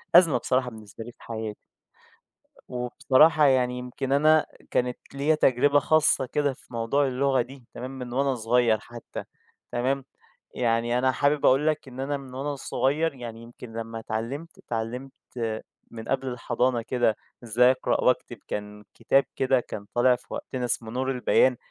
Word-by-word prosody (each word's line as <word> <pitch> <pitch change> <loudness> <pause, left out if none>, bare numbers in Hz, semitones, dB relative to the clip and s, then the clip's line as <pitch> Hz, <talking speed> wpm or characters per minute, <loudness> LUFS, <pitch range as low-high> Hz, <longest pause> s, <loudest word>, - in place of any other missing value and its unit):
أزمة 165 -8 +7
بصراحة 125 +1 0
بالنسبة 110 -1 -10
لي 120 - -9
في - - -21
حياتي. 110 -2 -5 1.0
أ - - -20
وبصراحة 135 +5 +3
يعني 125 -2 +3
يمكن 125 +2 -5
أنا 155 +2 +5 0.3
كانت 125 0 0 0.2
ليَّ 145 +3 +2
تجربة 145 +1 +4
خاصّة 155 -2 +3
كده 140 +1 0
في 125 - -19
موضوع 120 +5 +1
اللغة 130 0 +2
دي 130 +1 -9
تمام 130 +2 -6
من 125 -1 -6
وأنا 135 +1 +1
صغيّر 115 -1 +2
حتّى، 120 +2 -9 0.5
تمام. 130 +2 0 0.5
يعني 120 0 +1
أنا 130 +1 +3
حابب 145 +2 +1
أقول 135 +4 +4
لك 155 -1 0
إن 130 0 -10
أنا 140 +2 -1
من 135 -2 -11
وأنا 140 +2 -3
صغيّر، 145 +4 0
يعني 115 -3 -8
يمكن 120 -1 -11
لمّا 115 0 -5
اتعلّمت، 120 +9 -5
اتعلّمت 120 +4 -4 0.8
من 115 -1 -7
قبل 135 0 0
الحضانة 125 0 0
كده 120 -2 +1 0.3
إزاي 120 +2 +5
أقرأ 130 - 0
وأكتب - - +1
كان 105 0 -5
كتاب 135 +4 +2
كده 130 -1 +3
كان 105 -3 -7
طالع 125 +1 +5
في 125 +2 -15
وقتنا 125 -1 -4
اسمه 115 -2 -2
نور 130 +2 -1
البيان، 125 0 +3
125 Hz, 160 wpm, -26 LUFS, 120-135 Hz, 1.0 s, أزمة